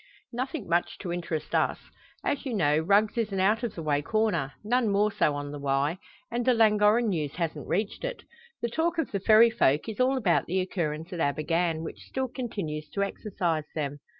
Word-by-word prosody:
"Nothing 255 - -3
much 170 +1 0
to 175 -3 -3
interest 165 -3 -4
us. - - +2 0.5
As 285 - 0
you 260 -5 -3
know, 150 -6 +3
Rugg's 205 +7 +3
is 220 -2 -1
an 195 - -2
out 210 +4 +3
of 235 -4 -3
the 165 - -5
way 145 -2 +1
corner 175 -8 0
none 235 +1 +2
more 205 +1 +2
so 150 -6 +1
on 145 0 -5
the 145 - -6
Wye 140 +5 0 0.3
and 240 +1 -1
the 250 0 +3
Llangorren 215 +1 +4
news 155 -7 -2
hasn't 165 -2 -3
reached 205 +3 -1
it. - - -4 0.4
The 235 - +1
talk 330 +7 0
of 325 - -1
the 200 - -1
Ferry 220 +4 +6
folk 145 -4 +2
is 220 0 -6
all 260 +1 +3
about 195 -9 +2
the 185 +3 0
occurrence 165 -3 -3
at 175 - -5
Abergann, 165 +2 0
which 160 - -7
still 265 -1 -4
continues 185 - -4
to 200 - +2
exercise 180 -6 -2
them. 145 -2 -3
195 Hz, 205 wpm, -28 LUFS, 160-225 Hz, 0.5 s, Ferry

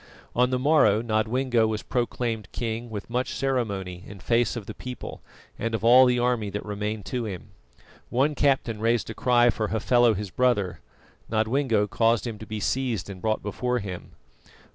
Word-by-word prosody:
On 125 +1 +3
the 130 - +1
morrow 125 -6 +4
Nodwengo 115 +1 +1
was 110 -1 -3
proclaimed 120 -3 -2
king 115 0 -4
with 105 -2 -6
much 125 +2 -2
ceremony 100 -9 -2
in 100 - -10
face 120 +6 +1
of 115 -4 -5
the - - -7
people 125 -1 -8 0.4
and 115 0 -1
of 110 - -4
all 125 +3 +7
the 125 0 +2
army 120 -4 0
that 105 +1 -5
remained 105 0 -4
to 125 -2 -3
him. 95 -5 -7 0.6
One 135 +5 +2
captain 130 -6 +1
raised 115 +1 +1
a - - -5
cry 120 -1 +4
for 110 -1 -2
Hafela 115 +1 +3
his 100 -1 -5
brother. 100 -9 +1 0.5
Nodwengo 110 0 +1
caused 115 +3 +2
him 115 -3 -5
to 110 - -9
be 110 0 -4
seized 115 -5 -1
and 95 -2 -10
brought 110 -1 0
before 125 +4 -1
him. 95 -6 -6
115 Hz, 175 wpm, -26 LUFS, 105-125 Hz, 0.6 s, all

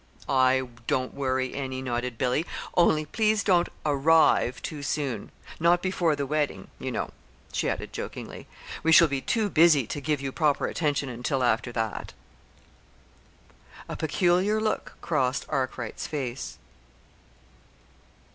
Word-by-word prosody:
"I 130 0 +3 0.2
don't 130 0 0
worry 130 -2 -1
any," 130 -2 -4
nodded 125 -2 -3
Billy, 125 +5 +1 0.3
"only 155 -3 +4
please 215 +5 +1
don't 175 -3 +3 0.2
'arrive' 145 -3 +4
too 150 -2 -5
soon 140 -6 -3 0.3
not 175 +2 +3
before 175 -4 +1
the 140 -1 -2
wedding, 150 0 -2
you - - -4
know," - - -3 0.4
she - - 0
added - - -4
jokingly. - - -7 0.3
"We 160 - +2
shall 165 +1 +8
be 135 -2 -2
too 220 - 0
busy 160 - +5
to 145 - -5
give 150 0 0
you 135 0 -3
proper 150 -1 +1
attention 145 -4 -1
until 125 +2 -2
after 120 0 +1
that." 110 -2 -3 1.7
A - - -5
peculiar 180 +6 +2
look 215 0 -2
crossed 135 -5 0
Arkwright's 130 -4 -3
face. 135 -4 -4
140 Hz, 130 wpm, -27 LUFS, 130-165 Hz, 1.7 s, shall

